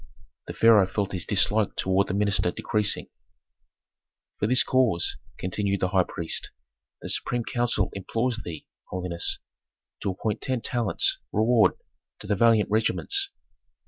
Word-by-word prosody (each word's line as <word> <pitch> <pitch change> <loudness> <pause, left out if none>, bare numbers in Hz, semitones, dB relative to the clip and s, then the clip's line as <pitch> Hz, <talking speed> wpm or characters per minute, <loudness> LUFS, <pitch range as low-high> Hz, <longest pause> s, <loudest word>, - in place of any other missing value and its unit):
The - - -7
pharaoh 110 -4 +5
felt 100 0 -2
his 90 -3 -3
dislike 105 +1 +1
toward 95 +1 +1
the 95 - -2
minister 100 -3 +2
decreasing. 105 +3 +1 1.3
"For 105 - +1
this 125 +2 +6
cause," 125 -10 +1 0.2
continued 100 +2 -1
the 90 - +1
high 95 -1 +2
priest, 85 -1 -3 0.5
"the - - -5
supreme 120 -1 -1
council 120 -5 0
implores 115 +4 -2
thee, 80 -3 -8 0.2
holiness, 90 -2 -1 0.6
to 100 - -2
appoint 105 +3 -3
ten 130 -3 -2
talents' 120 -4 0
reward 110 +1 +3 0.4
to - - -9
the 105 0 0
valiant 110 0 +3
regiments. 390 - +1
105 Hz, 135 wpm, -25 LUFS, 95-115 Hz, 1.3 s, this